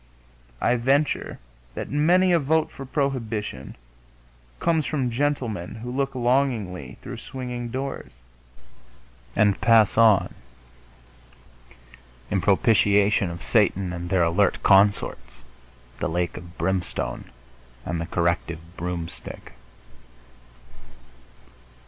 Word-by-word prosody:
I 125 Hz, -, +2 dB
venture 135 Hz, +5 st, +1 dB, 0.4 s
that -, -, -5 dB
many 175 Hz, +6 st, +3 dB
a 170 Hz, -, +4 dB
vote 155 Hz, +2 st, +1 dB
for 135 Hz, -, -9 dB
prohibition 115 Hz, -, -3 dB, 0.8 s
comes 160 Hz, -3 st, +1 dB
from 135 Hz, -6 st, -1 dB
gentlemen 120 Hz, -9 st, -2 dB
who 120 Hz, +2 st, -7 dB
look 135 Hz, -1 st, -1 dB
longingly 120 Hz, -, 0 dB
through -, -, -7 dB
swinging 125 Hz, -2 st, -6 dB
doors 135 Hz, -, -5 dB, 1.2 s
and 105 Hz, -2 st, +2 dB
pass 115 Hz, -2 st, +4 dB
on 110 Hz, -4 st, +5 dB, 2.0 s
in 95 Hz, -, +1 dB
propitiation 100 Hz, -2 st, +3 dB
of 85 Hz, -1 st, -8 dB
Satan 100 Hz, -4 st, +1 dB
and 85 Hz, 0 st, -5 dB
their 95 Hz, -2 st, +3 dB
alert 85 Hz, +4 st, +1 dB
consorts, 65 Hz, -, +2 dB, 0.6 s
the -, -, -1 dB
lake 85 Hz, +1 st, -1 dB
of 85 Hz, 0 st, -11 dB
brimstone 90 Hz, -10 st, -2 dB, 0.6 s
and 85 Hz, -1 st, -2 dB
the 85 Hz, -, -4 dB
corrective 85 Hz, 0 st, -2 dB
broomstick.... 85 Hz, -1 st, -6 dB
105 Hz, 100 wpm, -24 LUFS, 90-130 Hz, 2.0 s, on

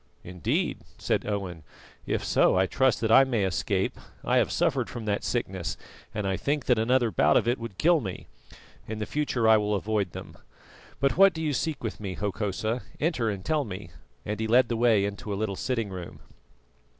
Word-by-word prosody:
"Indeed," 90 Hz, -2 st, -1 dB, 0.2 s
said -, -, -1 dB
Owen. 95 Hz, -5 st, -3 dB, 0.5 s
"If -, -, -1 dB
so, -, -, +3 dB
I 95 Hz, -, +4 dB
trust 130 Hz, +3 st, +1 dB
that 110 Hz, -1 st, +1 dB
I 135 Hz, -, +8 dB
may 120 Hz, -6 st, 0 dB
escape. 95 Hz, -2 st, -1 dB, 0.2 s
I -, -, +2 dB
have -, -, +2 dB
suffered -, -, +1 dB
from 115 Hz, -2 st, -6 dB
that 105 Hz, -1 st, -1 dB
sickness, 95 Hz, -8 st, -2 dB, 0.3 s
and 105 Hz, -1 st, -3 dB
I 95 Hz, -1 st, 0 dB
think 145 Hz, -1 st, -1 dB
that 125 Hz, -3 st, +3 dB
another 120 Hz, 0 st, +2 dB
bout -, -, +4 dB
of -, -, +1 dB
it 120 Hz, +1 st, +1 dB
would 115 Hz, -5 st, -7 dB
kill 170 Hz, -1 st, +4 dB
me. 95 Hz, -6 st, -6 dB, 0.6 s
In 110 Hz, 0 st, -4 dB
future 130 Hz, -4 st, 0 dB
I 110 Hz, 0 st, +7 dB
will 105 Hz, 0 st, 0 dB
avoid 100 Hz, -2 st, -1 dB
them. -, -, -9 dB, 0.6 s
But 140 Hz, +2 st, +1 dB
what 195 Hz, -1 st, +7 dB
do 160 Hz, -, -5 dB
you 150 Hz, -2 st, 0 dB
seek 150 Hz, +1 st, -2 dB
with 110 Hz, -, -4 dB
me, 95 Hz, -3 st, -5 dB
Hokosa? 105 Hz, +3 st, -2 dB, 0.2 s
Enter 145 Hz, -8 st, 0 dB
and 100 Hz, -2 st, -5 dB
tell 155 Hz, -2 st, +1 dB
me," 95 Hz, -, -8 dB, 0.3 s
and 105 Hz, 0 st, -3 dB
he 110 Hz, -, -1 dB
led 120 Hz, +2 st, +4 dB
the 120 Hz, -, 0 dB
way 115 Hz, -4 st, +3 dB
into 100 Hz, +2 st, -5 dB
a -, -, -1 dB
little 105 Hz, -2 st, -2 dB
sitting 115 Hz, -1 st, -2 dB
room. 90 Hz, -2 st, -8 dB
110 Hz, 200 wpm, -27 LUFS, 100-125 Hz, 0.6 s, I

